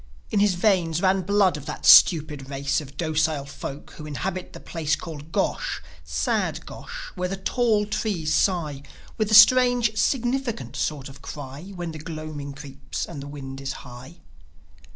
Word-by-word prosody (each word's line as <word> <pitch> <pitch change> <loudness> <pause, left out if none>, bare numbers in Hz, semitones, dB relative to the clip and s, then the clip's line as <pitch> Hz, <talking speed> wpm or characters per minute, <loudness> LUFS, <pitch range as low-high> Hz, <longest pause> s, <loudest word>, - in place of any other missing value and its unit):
In 205 - +2
his 200 -2 +3
veins 175 -4 +2
ran 190 0 +3
blood 195 -3 +2
of 145 - -10
that - - -5
stupid 150 -5 +6
race 140 +2 -1
Of 140 -1 -12
docile 155 -3 0
folk, 140 +1 -8
who 150 - -8
inhabit 180 +5 -4
the - - -10
place 155 -2 -1
Called 155 -2 -9
Gosh, - - -1 0.2
sad 75 -1 -1
Gosh, - - -9
where 180 0 -2
the 195 - -3
tall 215 +1 +1
trees 195 -7 -1
sigh 155 -8 +1 0.4
With 215 -1 +1
a 215 - +5
strange, 245 0 +7
significant 240 - -1
sort 140 -3 -2
of 140 0 -12
cry 145 +7 -8
When 175 -2 -4
the 155 - -8
gloaming 155 -2 -6
creeps 140 0 -6
and 155 -5 -8
the 140 - -8
wind 135 -2 -8
is 135 0 -3
high. 125 +5 -12
155 Hz, 165 wpm, -24 LUFS, 140-195 Hz, 0.4 s, strange